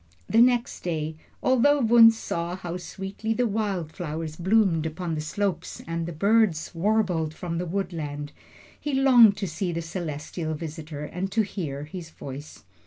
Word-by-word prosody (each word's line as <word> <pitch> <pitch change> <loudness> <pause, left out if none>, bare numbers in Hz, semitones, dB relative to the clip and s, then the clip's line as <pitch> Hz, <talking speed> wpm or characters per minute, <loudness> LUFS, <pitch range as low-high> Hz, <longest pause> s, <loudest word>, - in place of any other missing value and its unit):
The 225 - +4
next 245 +1 +3
day, 160 -3 -2 0.3
although 260 +3 +4
Wunzh 230 -2 +7
saw 170 -4 -3
how 180 -1 -5
sweetly 195 +4 -4
the 245 - +2
wild 200 -7 -1
flowers 160 -1 -5
bloomed 180 -3 +2
upon 165 +1 -4
the 155 - -2
slopes 180 +2 -2
and 165 0 -3
the - - -4
birds 200 -1 +2
warbled 175 -4 +1
from 170 -2 -4
the 180 - -3
woodland, 155 -6 -3 0.5
he 295 -2 -2
longed 245 -6 +7
to 195 -1 -2
see 175 +3 -2
the 170 0 -3
celestial 160 -1 -4
visitor 155 -1 -6
and 185 +5 -4
to 220 - +3
hear 155 -9 -4
his 165 +2 -8
voice. 145 -1 -9
175 Hz, 160 wpm, -26 LUFS, 160-215 Hz, 0.5 s, Wunzh